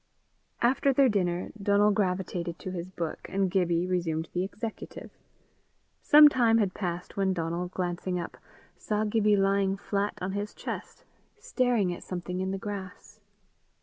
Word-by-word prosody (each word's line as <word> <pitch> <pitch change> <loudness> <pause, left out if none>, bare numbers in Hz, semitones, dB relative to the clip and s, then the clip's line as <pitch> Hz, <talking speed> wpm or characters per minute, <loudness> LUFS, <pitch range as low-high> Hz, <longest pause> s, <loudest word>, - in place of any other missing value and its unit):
After 265 +3 +3
their 270 0 +4
dinner, 180 -4 -1
Donal 205 +1 +4
gravitated 180 -4 -1
to 185 - -6
his 180 0 -5
book, 170 -3 -5
and 190 -1 0
Gibbie 175 -2 +1
resumed 170 -3 -1
the 180 - 0
executive. 215 +3 -7 0.9
Some 300 0 +9
time 235 -5 +4
had 200 -4 +1
passed 175 -2 -5
when 195 -1 +2
Donal, 170 +1 -2
glancing 180 0 -3
up, 170 - -6 0.4
saw 210 0 -1
Gibbie 210 -1 +3
lying 195 0 +2
flat 200 +1 -2
on 185 +1 -3
his 205 +1 -4
chest, - - -7 0.3
staring 245 - +1
at - - -9
something 180 0 -4
in 190 0 -1
the 195 - -2
grass. 195 -2 -7
190 Hz, 150 wpm, -28 LUFS, 180-210 Hz, 0.9 s, Some